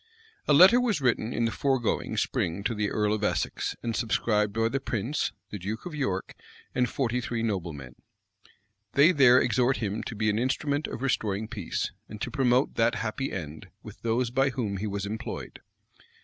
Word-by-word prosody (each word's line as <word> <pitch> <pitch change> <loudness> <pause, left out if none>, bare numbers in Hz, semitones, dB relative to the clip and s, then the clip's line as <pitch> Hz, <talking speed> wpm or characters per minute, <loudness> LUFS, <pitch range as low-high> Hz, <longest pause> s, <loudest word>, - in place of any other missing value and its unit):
A 150 - +5
letter 190 - +8
was 230 -8 +1
written 120 -3 +1
in 115 0 0
the 115 - 0
foregoing 130 -4 0
spring 85 +4 -1
to 115 - 0
the 105 -2 -1
earl 105 0 +1
of 105 -1 -2
Essex, - - -1
and 115 -1 -2
subscribed 105 -2 +1
by 115 +2 +1
the 135 +4 -1
prince, 125 +2 -2 0.2
the 105 - -5
duke 105 +5 -5
of 175 - -6
York, 100 -11 -2 0.4
and 125 -1 +1
forty 125 -1 -1
three 120 -1 -3
noblemen.[*] 85 - -3 1.0
They 145 +5 +6
there 130 -6 +6
exhort 125 +2 +2
him 105 0 -2
to - - -5
be 110 0 +1
an 105 - -1
instrument 140 +4 0
of 125 - -6
restoring 110 -5 0
peace, 105 -7 -3 0.2
and 105 - -8
to - - -4
promote 130 -2 +2
that 115 +1 +3
happy 120 +3 -3
end 80 -4 -6 0.2
with - - -11
those 115 +1 0
by 135 +2 +2
whom 110 -7 -2
he 105 +3 -3
was 100 0 -3
employed. 110 +2 -6
115 Hz, 185 wpm, -27 LUFS, 105-130 Hz, 1.0 s, letter